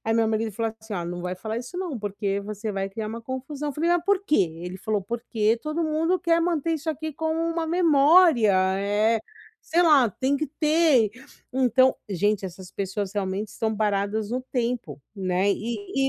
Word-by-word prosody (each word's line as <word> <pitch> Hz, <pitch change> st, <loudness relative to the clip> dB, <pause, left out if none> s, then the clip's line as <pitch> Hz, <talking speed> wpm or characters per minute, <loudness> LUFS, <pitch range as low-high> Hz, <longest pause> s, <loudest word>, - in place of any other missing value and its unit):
Aí 225 Hz, 0 st, 0 dB
meu 230 Hz, -1 st, +3 dB
marido 220 Hz, 0 st, 0 dB
ele 205 Hz, -, -11 dB
falou 225 Hz, -1 st, -1 dB
assim, 220 Hz, -1 st, -7 dB
ó: 175 Hz, -3 st, -3 dB
"Não 175 Hz, +1 st, -5 dB
vai 180 Hz, +1 st, -3 dB
falar 220 Hz, +4 st, -4 dB
isso 250 Hz, +8 st, -8 dB
não, 355 Hz, -8 st, -3 dB
porque 200 Hz, -1 st, -2 dB
você 210 Hz, +1 st, -5 dB
vai 195 Hz, 0 st, -2 dB
criar 215 Hz, +2 st, -5 dB
uma 225 Hz, +2 st, -5 dB
confusão”. 265 Hz, +5 st, -5 dB
Eu -, -, -3 dB
falei: 330 Hz, +3 st, +1 dB
“Ah, 350 Hz, 0 st, +3 dB
por 395 Hz, +2 st, +1 dB
quê?”, 195 Hz, -, +2 dB
ele 180 Hz, +1 st, -6 dB
falou: 210 Hz, 0 st, -1 dB
“Porque 225 Hz, +1 st, 0 dB
todo 305 Hz, +2 st, -1 dB
mundo 320 Hz, +4 st, +1 dB
quer 335 Hz, -1 st, +2 dB
manter 330 Hz, -2 st, 0 dB
isso 320 Hz, 0 st, -3 dB
aqui 315 Hz, 0 st, -3 dB
como 320 Hz, +2 st, -2 dB
uma 330 Hz, 0 st, -1 dB
memória, 320 Hz, -, +5 dB, 0.3 s
eh, 210 Hz, +3 st, +2 dB, 0.4 s
sei 345 Hz, +2 st, +2 dB
lá, 295 Hz, -8 st, +6 dB
tem 265 Hz, +7 st, 0 dB
que 310 Hz, -, -1 dB
ter”. 305 Hz, -8 st, +4 dB, 0.4 s
Então 260 Hz, 0 st, +4 dB
gente, 200 Hz, +1 st, 0 dB
essas 185 Hz, 0 st, -10 dB
pessoas 200 Hz, 0 st, -3 dB
realmente 200 Hz, +1 st, -2 dB
estão 220 Hz, +1 st, -2 dB
paradas 205 Hz, 0 st, 0 dB
no 250 Hz, +2 st, -1 dB
tempo, 235 Hz, -, -2 dB, 0.2 s
né, 190 Hz, 0 st, +1 dB
e 235 Hz, +5 st, -2 dB
230 Hz, 195 wpm, -25 LUFS, 205-310 Hz, 0.4 s, lá